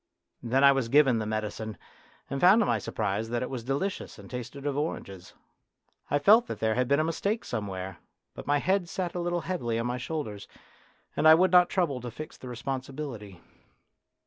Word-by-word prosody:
Then 130 +4 +1
I 140 - +9
was 135 -4 0
given 135 -4 +5
the 110 - -3
medicine, 110 -1 -4 0.5
and 135 - -4
found 190 +5 +7
to 220 - +3
my - - +1
surprise 110 +1 -2
that 120 +1 -1
it 125 - -5
was 125 -3 -4
delicious 140 +10 -3
and 100 0 -13
tasted 125 +3 -7
of 145 -2 -1
oranges. 100 - -5 0.7
I 145 - +2
felt 220 +10 +5
that - - -5
there 110 0 +1
had 125 +2 0
been 140 +2 +3
a - - +3
mistake 200 +7 -1
somewhere, 95 -3 -5 0.3
but - - -10
my 145 +1 +3
head 185 +3 0
sat 180 -2 -3
a 180 - -3
little 175 0 -1
heavily 140 -11 -2
on 115 - -1
my 125 +1 -2
shoulders, 120 -9 -5 0.7
and 155 - +3
I 160 - +10
would 185 +2 +3
not 180 -1 +6
trouble 155 -9 0
to 120 - -5
fix 150 +7 -8
the 125 - -10
responsibility. 125 - -6
135 Hz, 200 wpm, -28 LUFS, 115-160 Hz, 0.7 s, I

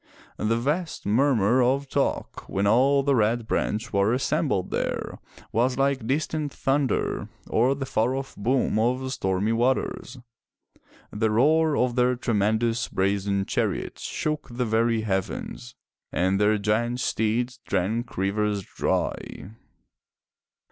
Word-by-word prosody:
The 115 +2 +1
vast 150 +8 -2
murmur 120 +1 +3
of 135 +3 +1
talk - - -2
when 100 +1 0
all 135 +6 +4
the 140 0 +2
Red 115 -1 +2
Branch 110 +1 -2
were 100 +3 +3
assembled 140 - 0
there, - - -3 0.3
was 125 +3 +1
like 135 -4 +1
distant 150 +2 -1
thunder, 135 -2 0 0.2
or 125 +4 +2
the 135 -1 -4
far 125 0 0
off 135 0 -5
boom 120 0 +1
of 130 +3 0
stormy 95 +1 0
waters; 125 +2 0 0.9
the 110 +1 0
roar 150 +7 +3
of 125 -1 +1
their 125 0 +3
tremendous 115 +1 0
brazen 100 0 0
chariots - - -2
shook 155 -1 -3
the 125 +1 -2
very 115 0 +1
heavens, 95 - -4 0.4
and 95 +3 +1
their 105 +1 +4
giant 115 +4 0
steeds 120 +2 -1
drank 110 +5 -2
rivers 100 +1 0
dry. 95 - -3
120 Hz, 125 wpm, -25 LUFS, 105-130 Hz, 0.9 s, all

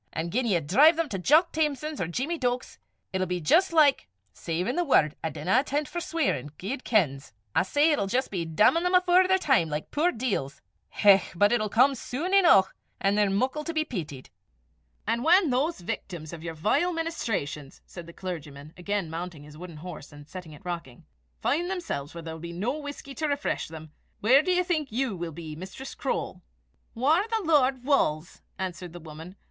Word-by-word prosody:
An' 165 +1 -3
gien 250 +4 0
ye 185 -6 +2
drive 270 - +5
them 330 -2 -1
to 195 - -3
Jock 310 - +4
Thamson's, 305 -1 -1
or 170 - -1
Jeemie 275 - -2
Deuk's, 245 -1 -2 0.3
it'll 185 0 0
be 180 0 -2
jist 335 - +3
like 300 -4 +4 0.3
savin' 180 - -2
the 350 - +1
word, 155 - +3
I 160 - 0
dinna 185 - +1
inten' 290 +1 -1
't - - -11
for 345 - -4
sweirin', 325 - -1
guid 250 +8 -5
kens! 140 - 0 0.2
I - - +4
say, 290 - +2
it'll 280 -10 +1
jist 250 +6 -1
be 180 -4 -2
dammin' 210 - +3
them 360 +1 +1
afore 365 0 +5
their 375 0 +4
time, 265 - +2
like 150 0 -4
the - - -17
puir 330 +5 +3
deils. 210 - -3 0.3
Hech! 195 -2 +4
but 205 +4 +4
it'll 215 -3 +1
come 255 +6 +4
sune 285 +8 -4
eneuch, 335 - +6 0.3
an' 195 0 +2
they're 205 -1 +2
muckle 255 +9 0
to 335 +1 -5
be 310 0 +1
peetied!" 155 - -7 0.7
"And 235 +1 0
when 345 -1 +5
those 275 - 0
victims 170 -2 -6
of 165 - -8
your 165 -1 -6
vile 215 - +1
ministrations," 210 - -4
said 175 -2 -10
the - - -9
clergyman, 155 -5 -7
again 200 0 -2
mounting 165 -1 -6
his 150 0 -13
wooden 170 0 -9
horse, 160 -2 -9
and 145 0 -13
setting 180 -2 -9
it 150 - -15
rocking, 170 -9 -6 0.4
"find 340 +6 +1
themselves 250 - -4
where 170 - -7
there 160 0 -6
will 160 - -9
be 170 0 -7
no 215 +10 -2
whisky 285 -2 -7
to 310 +2 -2
refresh 285 0 -2
them, 160 -1 -10 0.3
where 255 +7 +5
do 365 - -1
you 360 0 +3
think 315 -7 -1
you 245 -2 -1
will 170 -1 -5
be, 155 -1 -8
Mistress 190 - -8
Croale?" - - -3 0.5
"Whaur 310 - +2
the 450 -2 -1
Lord 270 -5 +3
wulls," 175 - 0 0.2
answered 185 -2 -5
the 175 - -8
woman. 160 +3 -10
210 Hz, 200 wpm, -27 LUFS, -, 0.7 s, eneuch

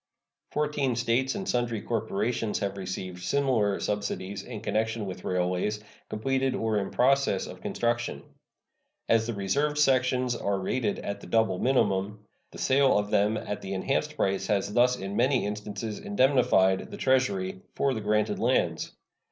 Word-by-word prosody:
Fourteen 145 -4 0
States 120 +3 +1
and 195 -2 -4
sundry 120 -2 0
corporations 110 -1 -1
have 100 -1 -2
received 95 -1 -5
similar 115 -2 +1
subsidies 100 -1 -3
in 120 -4 -7
connection 110 0 -1
with 95 -2 -7
railways 90 +3 0 0.3
completed 130 +4 0
or 110 -2 0
in 100 - -3
process 135 -6 +2
of - - -10
construction. 120 0 -1 0.8
As 115 0 +3
the 115 - -3
reserved 140 +10 0
sections 130 -3 +2
are 100 -3 -1
rated 105 +2 -1
at 100 - -5
the - - -10
double 110 -5 +2
minimum, 105 -5 +1 0.2
the - - -12
sale 135 -2 +3
of 105 0 -1
them 105 +2 +3
at 105 - -4
the 95 0 -4
enhanced 95 - -1
price 95 0 0
has 100 -1 0
thus 125 +2 +4
in 100 -3 -5
many 130 +1 +2
instances 105 +1 -4
indemnified 125 - +3
the - - -8
Treasury 100 -9 +1
for 140 -1 +1
the 110 - -3
granted 105 +1 +1
lands. - - +1
110 Hz, 150 wpm, -28 LUFS, 100-125 Hz, 0.8 s, thus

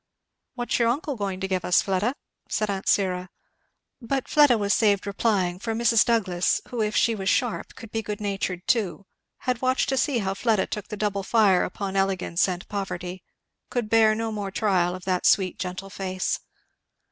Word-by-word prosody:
"What's 245 0 -1
your 235 - +3
uncle 280 +4 -1
going 195 -4 -3
to 190 - -1
give 185 -2 -1
us, 180 - +3
Fleda?" 200 +7 0 0.3
said 215 -1 0
aunt 195 0 -4
Syra. 185 -2 +1 0.7
But 265 +2 -2
Fleda 290 -6 +5
was 205 -1 +1
saved 205 -3 +2
replying; 200 -3 0
for 225 +1 -3
Mrs. 230 -1 +4
Douglass, 190 -7 +1
who 240 -2 -2
if 210 0 -1
she 230 - +3
was 195 -3 -2
sharp 245 -3 -1
could 225 -2 -11
be 225 - -1
good 210 -1 -5
natured 195 -3 -3
too, 200 -4 0
and - - -28
had 250 -2 0
watched 255 0 +1
to 265 - 0
see 260 +1 +1
how 195 -3 -1
Fleda 215 -1 +1
took 210 - -5
the 210 - -6
double 205 -1 -1
fire 200 -3 +3
upon 195 +1 -4
elegance 195 -2 +1
and 180 -1 -4
poverty, 185 -2 -5 0.5
could 235 -4 -2
beat 220 -1 +5
no 225 0 -2
more 205 -2 -3
trial 185 -3 +1
of 185 - -10
that 185 -1 +1
sweet 185 -2 +3
gentle 185 +1 -5
face. 185 -2 -2
200 Hz, 190 wpm, -25 LUFS, 190-225 Hz, 0.7 s, Fleda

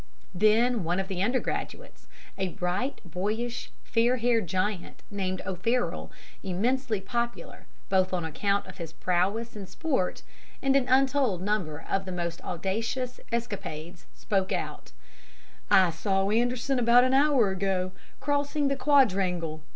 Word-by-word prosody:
Then 215 +3 +3
one 175 +3 0
of 190 0 -3
the 185 -2 -2
undergraduates, 255 - -2 0.3
a 190 -1 -1
bright, 180 +10 -2
boyish, 215 +7 -3
fair 240 +2 +2
haired 230 -4 +2
giant, 185 +2 -2
named 185 -2 -2
O'Farroll, 230 +7 -1 0.3
immensely 225 +4 0
popular 235 +5 -4 0.2
both 185 -1 +2
on 180 -3 -1
account 200 +6 0
of - - -12
his 165 -2 -6
prowess 195 +8 0
in 200 -3 -7
sport 265 - -1 0.4
and 270 0 +2
an 260 -2 +2
untold 260 -7 +3
number 180 -7 -2
of 195 0 0
the 185 - -5
most 170 -1 -4
audacious 225 +8 -2
escapades, 180 -8 -4
spoke 195 -3 -1
out: - - -4 0.8
"'I 185 -3 +6
saw 195 +3 0
Anderson, 245 +3 +1
about 240 +1 +6
an 255 +1 +2
hour 270 -7 +4
ago, 190 -1 -1 0.3
crossing 285 0 0
the 275 - +1
quadrangle. 190 - +2
205 Hz, 135 wpm, -28 LUFS, 185-245 Hz, 0.8 s, I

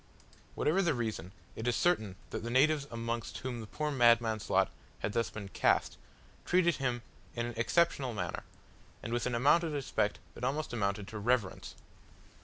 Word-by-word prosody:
Whatever 165 +6 +2
the 170 -6 +2
reason, 110 -7 -3 0.2
it 110 - -4
is 120 - +2
certain 110 - +1 0.2
that - - -3
the 115 - -3
natives 140 +3 +3
amongst 115 0 -3
whom 125 -3 -4
the 110 - -8
poor 150 +7 -2
madman's 115 -4 +3
lot 95 0 +3 0.3
had 105 - -2
thus 115 -1 +1
been 100 -2 -7
cast, - - +2 0.5
treated 175 -2 +3
him 125 -4 -1 0.3
in 120 -1 -1
an 120 - -4
exceptional 130 +3 +2
manner, 90 -6 -3 0.6
and 115 - -4
with 120 +1 0
an 125 - -1
amount 145 +8 +4
of 160 -2 -2
respect 130 -7 0 0.2
that - - -10
almost 140 +2 -1
amounted 100 -3 -1
to 110 - -6
reverence. 115 -3 0
120 Hz, 175 wpm, -32 LUFS, 110-140 Hz, 0.6 s, amount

